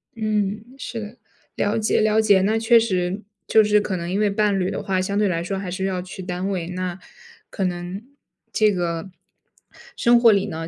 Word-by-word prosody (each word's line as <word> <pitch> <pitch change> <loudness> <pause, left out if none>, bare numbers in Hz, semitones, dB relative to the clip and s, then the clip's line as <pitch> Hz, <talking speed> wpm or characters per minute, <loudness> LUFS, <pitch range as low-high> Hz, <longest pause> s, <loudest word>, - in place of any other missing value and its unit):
嗯， 215 -1 -1
是 240 -3 -6
的， 215 +2 -8 0.4
了 205 +2 0
解， 215 - +1
了 215 0 +3
解， 200 -3 +4
那 215 +4 +1
确 230 +1 +5
实 185 -3 -1 0.3
就 220 - +5
是 210 0 +3
可 195 - -3
能 170 0 -5
因 195 - 0
为 210 -1 +3
伴 200 -1 +1
侣 185 - 0
的 - - -4
话， 190 -1 0
相 200 +2 -2
对 210 0 +3
来 170 -2 -1
说 195 +2 -3
还 190 -2 -5
是 190 +1 -2
要 185 -2 -1
去 185 +1 -9
单 180 +1 -3
位， 180 -4 -2
那 180 0 -4 0.5
可 195 - -3
能 180 +3 -3 0.5
这 215 -2 +3
个 175 -1 -2 0.9
生 240 0 +4
活 230 -2 +7
里 200 -1 +2
呢， 165 +1 -5
195 Hz, 220 characters per minute, -22 LUFS, 180-215 Hz, 0.9 s, 活